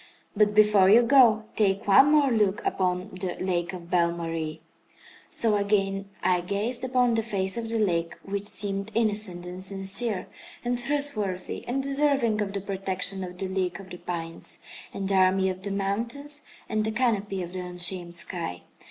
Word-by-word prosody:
But 210 0 +3
before 210 -3 +5
you 230 +4 +7
go, 235 -3 +5
take 200 0 +1
one 270 +9 +7
more 290 -3 +4
look 210 -3 +1
upon 185 +2 -1
the 180 -1 -3
Lake 175 -2 -2
of 175 -2 -10
Belle 170 -1 +3
Marie!" 165 -2 -4 0.7
So 225 -2 +1
again 195 -1 0
I 180 -1 +2
gazed 205 +8 -2
upon 250 -2 +2
the 225 - +2
face 195 -4 -2
of 230 -1 -4
the 230 - -1
lake, 170 -6 0
which 200 +1 -4
seemed 200 -1 -2
innocent, 210 -5 0
and 180 +1 -6
sincere, 195 +2 +2 0.4
and 245 0 0
trustworthy, 240 -9 -2
and 270 +3 -1
deserving 275 -6 +1
of 200 -1 -3
the 200 - -3
protection 190 0 -1
of 180 0 -8
the 190 - -3
league 185 -1 -2
of 190 -1 -12
the 180 - -7
pines, 165 -2 -5 0.3
and 195 - -4
the 195 - 0
army 190 0 +3
of 185 0 -8
the 200 - -4
mountains, 235 +10 -2 0.2
and 215 -1 0
the 220 - -1
canopy 210 -5 0
of 175 +1 -8
the 185 - -4
unshamed 180 -1 -1
sky. 170 - -4
195 Hz, 175 wpm, -26 LUFS, 185-225 Hz, 0.7 s, you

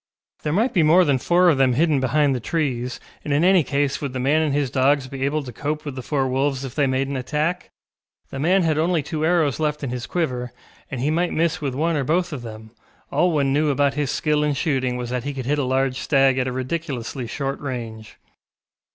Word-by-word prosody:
There 150 - -2
might 220 - +1
be 175 - +3
more 170 +4 +5
than 140 -3 +2
four 175 +6 +3
of 155 -6 +4
them 130 -2 +4
hidden 150 +1 +2
behind 140 +2 +2
the 125 - -2
trees, 125 -3 -2 0.2
and 150 - -4
in 145 +3 +2
any 185 -2 +5
case 140 0 -1
would 140 -3 -4
the 130 - -3
man 145 +5 +2
and 155 -2 0
his 140 -3 0
dogs 135 +1 +2
be 135 0 -5
able 150 +1 -1
to 125 -3 -9
cope 150 +1 -3
with 145 - -4
the 130 - -6
four 135 0 -1
wolves 135 +1 -1
if 130 - -7
they 145 -2 +1
made 130 +1 0
an 140 - -4
attack? 150 +7 -2 0.6
The 135 - -5
man 180 +6 +3
had 155 -2 +1
only 165 -1 +1
two 155 +1 -3
arrows 160 -4 +2
left 150 -1 -1
in 130 - -3
his 125 -2 -5
quiver, 125 -8 -2 0.4
and 130 -3 -4
he 145 +4 +1
might 175 +2 0
miss 165 0 0
with 135 -3 -2
one 165 +4 0
or 145 - 0
both 175 +4 0
of 135 - -5
them; 110 -1 -10 0.4
all 180 - +2
one 140 -4 +1
knew 150 +1 +2
about 140 0 +2
his 145 -1 -1
skill 150 +1 +1
in 150 -1 0
shooting 130 -4 0
was 120 -1 -5
that 125 -1 -2
he 140 0 -4
could 130 -2 -5
hit 145 +3 0
a - - +1
large 130 0 0
stag 135 -2 +3
at 130 - 0
a - - -2
ridiculously 130 -2 -4
short 135 +3 -3
range. 115 -5 -6
140 Hz, 240 wpm, -22 LUFS, 130-155 Hz, 0.6 s, more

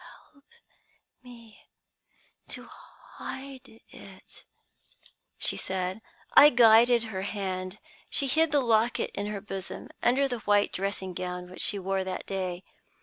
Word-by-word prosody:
"'Help 280 -2 -25 0.8
me 235 -3 -15 0.9
to - - -6 0.5
hide 265 -1 -8 0.2
it,' - - -15 0.9
she - - 0
said. 185 +2 -3 0.3
"I 295 - +10
guided 235 -1 +6
her 210 -5 -4
hand. 190 -1 -4 0.3
She 280 - 0
hid 315 +4 +2
the 290 -1 +3
locket 230 -1 +1
in 205 +1 -3
her 210 -1 -4
bosom, 195 -2 -7
under 265 +3 +3
the 245 -3 -4
white 205 -1 +2
dressing 190 -1 -3
gown 180 0 -5
which 185 - -7
she 205 - +2
wore 195 0 -1
that 185 0 -5
day. 185 -2 -3
205 Hz, 130 wpm, -28 LUFS, 190-245 Hz, 0.9 s, I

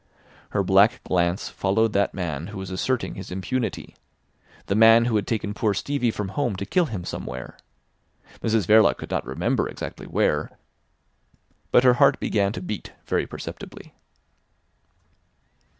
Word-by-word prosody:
Her 100 - 0
black 100 +5 +4
glance 85 +1 0
followed 105 +3 +1
that 100 - +1
man 85 -4 -3
who 105 -1 -8
was 95 -1 -6
asserting 125 +7 -1
his 95 -1 -8
impunity—the 100 +1 -6
man 115 +1 +7
who 120 -2 0
had 105 - 0
taken 105 -3 -2
poor 105 -1 0
Stevie 140 +2 0
from 105 -3 -3
home 120 +1 -1
to 100 - -4
kill 180 - +2
him 95 -9 -5
somewhere. 65 0 -6 0.8
Mrs 110 -3 +1
Verloc 110 +1 +5
could - - -9
not - - -2
remember - - -1
exactly - - -7
where, - - 0 1.1
but 125 - +5
her 125 -1 +6
heart - - +5
began 100 -2 +1
to 90 - -6
beat 105 +2 -6
very - - 0
perceptibly. - - -9
105 Hz, 145 wpm, -24 LUFS, 95-115 Hz, 1.1 s, man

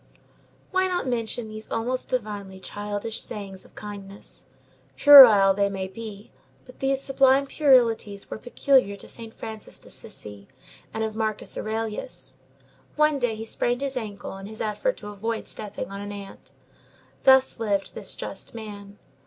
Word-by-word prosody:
Why 375 0 +2
not 360 -4 -1
mention 235 -1 -2
these 215 0 -9
almost 245 +3 -2
divinely 205 -6 -3
childish 205 +3 -4
sayings 195 -2 -7
of - - -21
kindness? 200 -1 -9 0.5
Puerile 230 -9 +10
they 200 0 +1
may 190 -1 -4
be; 210 +1 -9 0.3
but 255 - -15
these 270 0 +1
sublime 270 0 +3
puerilities 235 -8 +3
were - - -5
peculiar 250 -3 +2
to - - -12
Saint 230 -1 -8
Francis 220 -1 -7
d'Assisi 100 -1 -10 0.4
and 220 - -2
of 220 -1 -3
Marcus 220 -1 -2
Aurelius. 215 -10 -4 0.6
One 300 -1 +3
day 245 -3 0
he 220 +1 -6
sprained 245 +3 -1
his 275 -1 -2
ankle 210 -5 -5
in 195 0 -8
his 220 +1 -9
effort 225 - -1
to 210 - -8
avoid 220 +2 -4
stepping 210 -2 -6
on 200 0 -6
an 205 0 -6
ant. 200 -1 -10 0.7
Thus 265 -2 +5
lived 200 -3 -1
this - - -6
just - - -7
man. 205 -2 -9
220 Hz, 150 wpm, -25 LUFS, 200-250 Hz, 0.7 s, Puerile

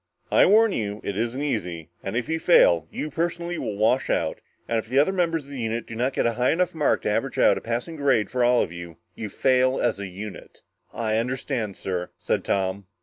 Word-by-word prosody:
"I - - +6
warn 220 +2 +5
you, 105 - -3
it 100 - -3
isn't 120 +6 -2
easy. 85 - -3
And 95 +4 -3
if 120 - -2
you 160 0 -1
fail, 85 - +5
you 155 - -5
personally 170 +2 -2
will 105 -2 -4
wash 110 +5 +2
out, - - -1 0.3
and 115 - +1
if 110 +2 -8
other 145 +8 +3
members 165 -4 0
of 140 - -14
the 135 - -6
unit 115 0 -2
do 115 - -8
not 125 +4 0
get - - 0
a 115 - +2
high 125 +2 +1
enough 180 +2 +1
mark 150 -3 +1
to - - 0
average - - -1
out - - +5
to - - -3
a - - -22
passing 120 +8 -3
grade 135 -7 +2
for 125 +1 +1
all 120 0 +4
of - - -6
you, 85 -2 -9 0.2
you 110 - -6
fail 130 +4 +2
as 115 -4 0
a 100 - -4
unit." 100 +3 -9 0.3
"I 110 -1 -1
understand, 120 -3 -2
sir," 90 -2 -3
said - - -1
Tom. 95 0 -1
120 Hz, 230 wpm, -24 LUFS, 100-140 Hz, 0.3 s, I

